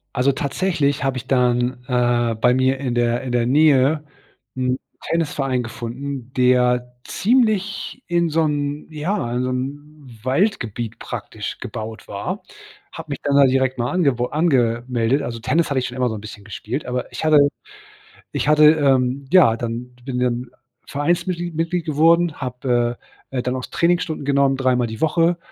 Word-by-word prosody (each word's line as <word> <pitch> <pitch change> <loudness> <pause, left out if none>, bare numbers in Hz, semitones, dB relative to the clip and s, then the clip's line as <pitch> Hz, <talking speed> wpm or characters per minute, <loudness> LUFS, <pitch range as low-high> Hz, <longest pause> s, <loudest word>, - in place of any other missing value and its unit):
Also 135 +1 +3
tatsächlich 145 0 -1
habe 135 -1 0
ich 125 - -7
dann, 125 -1 +1
äh, 120 -2 +1
bei 125 +3 +3
mir 130 +1 +2
in 130 -3 -2
der 120 0 +1
in 130 - -4
der 120 -1 +1
Nähe 145 +2 +4 0.5
'n 130 0 0 0.3
Tennisverein 140 -6 0
gefunden, 125 +3 -6
der 125 -1 +2
ziemlich 215 +1 0
in 170 -1 +1
so 160 +1 +1
'n 145 -1 -2
ja, 155 - -2
in 125 - 0
so 130 - -1
'n 135 -1 -6
Waldgebiet 120 - -1
praktisch 110 -3 -6
gebaut 110 -1 -7
war. - - -4 0.5
Habe - - -9
mich - - -4
dann 140 -1 +1
da 140 0 +7
direkt 130 0 +1
mal 120 0 -1
ange 165 -8 +2 0.2
angemeldet 125 -4 +1
also 115 -3 -5
Tennis 160 +7 +1
habe 140 -2 +1
ich 125 - -2
schon 125 - -6
immer 125 -1 +1
so 110 - -4
'n 105 - -7
bisschen 105 -1 -10
gespielt, 110 +6 -5
aber 125 0 -3
ich - - -6
hatte 155 -1 +5 0.9
ich - - -2
hatte, 150 0 +6
ähm, 135 -3 +1
ja, 170 -12 +6
dann 120 +2 -5
bin 125 -1 -3
dann 125 0 -1 0.4
Vereinsmitglied 175 +3 -1
Mitglied 165 +1 -1
geworden, 165 +2 +3
habe, 125 -2 -1
äh - - -28 0.3
äh, - - +1
dann 125 +1 -2
auch 130 - -4
Trainingsstunden 170 -2 0
genommen, 140 -1 +2
3 130 -1 +2
Mal 125 0 +1
die 110 0 -8
Woche, 165 +2 +2
130 Hz, 165 wpm, -21 LUFS, 125-150 Hz, 0.9 s, da